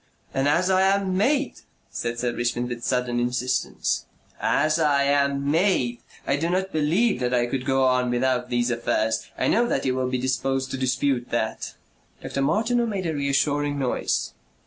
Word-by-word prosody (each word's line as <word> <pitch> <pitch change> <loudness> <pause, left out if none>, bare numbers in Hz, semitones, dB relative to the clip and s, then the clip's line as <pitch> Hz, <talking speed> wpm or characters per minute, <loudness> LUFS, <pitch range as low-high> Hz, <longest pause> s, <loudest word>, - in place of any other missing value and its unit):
"And 135 +1 +1
as 175 +6 +2
I 185 0 +4
am 195 -1 +2
made," 275 +8 +1 0.3
said 115 0 -3
Sir 120 0 -1
Richmond 120 +1 -1
with 120 -1 -6
sudden 125 -1 0
insistence, 125 +1 -1 0.4
"AS 155 +3 +2
I 145 -3 +3
AM 140 0 +1
MADE 155 -9 +1 0.3
I 140 - +1
do 165 +4 -1
not 190 +2 -1
believe 165 - +1
that 125 0 0
I 120 -1 +2
could 130 +2 -3
go 135 -1 +2
on 125 -1 +2
without 125 0 0
these 120 0 +1
affairs. 110 -1 -1
I - - 0
know 235 +2 +3
that - - -1
you 130 - +1
will 130 0 -1
be 130 - -1
disposed 130 +1 -1
to - - -3
dispute 130 -1 0
that." 110 -1 -3 0.4
Dr. 140 - -4
Martineau 230 - +1
made 195 -4 -3
a 160 - -1
reassuring 145 0 0
noise. 130 -3 -1
135 Hz, 175 wpm, -24 LUFS, 125-160 Hz, 0.4 s, I